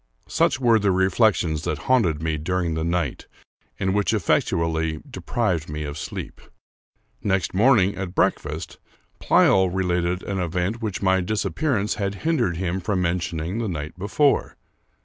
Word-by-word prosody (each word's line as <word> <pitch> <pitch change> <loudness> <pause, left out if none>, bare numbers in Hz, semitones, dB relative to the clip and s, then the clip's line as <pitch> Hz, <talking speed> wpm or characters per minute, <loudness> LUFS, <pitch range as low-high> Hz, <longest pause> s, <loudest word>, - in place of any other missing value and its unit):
Such - - +1
were 120 -3 +4
the 100 -1 +1
reflections 95 -4 +2
that 75 - -1
haunted 90 -12 +2
me 80 -2 -1
during 90 +1 -1
the 80 0 -2
night, 85 -4 -2 0.5
and 95 -1 0
which 105 0 +1
effectually 80 -1 0
deprived 90 -10 -2
me 75 +1 -4
of 70 -1 -5
sleep. 75 - -7 0.8
Next 95 -3 0
morning, 100 -2 +4
at 95 -1 -5
breakfast, - - -1 0.4
Pleyel 95 -1 +4
related 90 -1 -1
an 100 -1 -3
event 90 +6 -2
which 105 -4 -3
my 95 0 +3
dis 105 +4 -1
appearance 120 -10 0
had 100 0 -1
hindered 150 - +1
him 90 +1 -2
from 95 0 -1
mentioning 85 +1 -2
the 115 - -1
night 75 -2 -5
be 95 +3 -5
fore. 145 +5 +2
90 Hz, 150 wpm, -23 LUFS, 85-100 Hz, 0.8 s, were